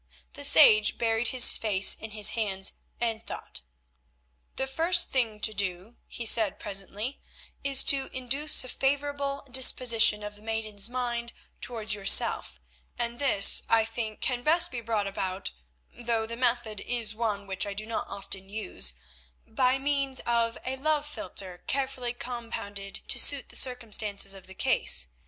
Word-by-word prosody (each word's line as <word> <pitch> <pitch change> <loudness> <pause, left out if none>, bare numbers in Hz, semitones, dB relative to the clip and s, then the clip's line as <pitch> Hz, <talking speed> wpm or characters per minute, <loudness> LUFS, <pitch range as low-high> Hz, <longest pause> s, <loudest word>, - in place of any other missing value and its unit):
The - - -8
sage 215 0 +6
buried 225 0 -1
his 255 -2 +7
face 200 -3 +2
in 220 - -9
his 210 -1 +1
hands 195 -4 0 0.3
and 225 -1 -3
thought. - - -8 0.9
"The 265 - -2
first 330 +6 +1
thing 230 -5 -1
to 220 0 0
do," 195 +2 -5
he 235 - -8
said 220 -2 +5
presently, 205 +5 -6 0.4
"is 275 -1 +4
to 270 -1 +2
induce 270 +4 +1
a 255 - -9
favourable 280 +1 -3
disposition 235 -4 +4
of 210 0 -8
the 205 - -16
maiden's 220 -1 -1
mind 240 -2 -4 0.3
towards 220 -4 -1
yourself, 195 - +4 0.4
and 235 0 -4
this, 260 -8 +6
I 225 -1 +3
think, 225 -1 -6
can 250 -2 -2
best 325 +6 +2
be 240 -2 -6
brought 220 -3 -2
about—though 190 - -5
the 230 +1 -7
method 235 -4 -2
is 230 -2 -1
one 215 -3 -3
which 190 0 -3
I 200 - -6
do 215 +2 -4
not 225 0 -5
often 195 -1 -8
use—by - - -3
means 275 -1 -2
of 235 -1 -1
a 265 +1 -4
love 300 +1 -1
philtre 185 -9 -5
carefully 265 -3 -3
compounded 230 -5 -7
to - - +3
suit - - +3
the - - -8
circumstances 215 -5 0
of 195 -1 -12
the 190 - -13
case. - - 0
225 Hz, 150 wpm, -27 LUFS, 200-255 Hz, 0.9 s, his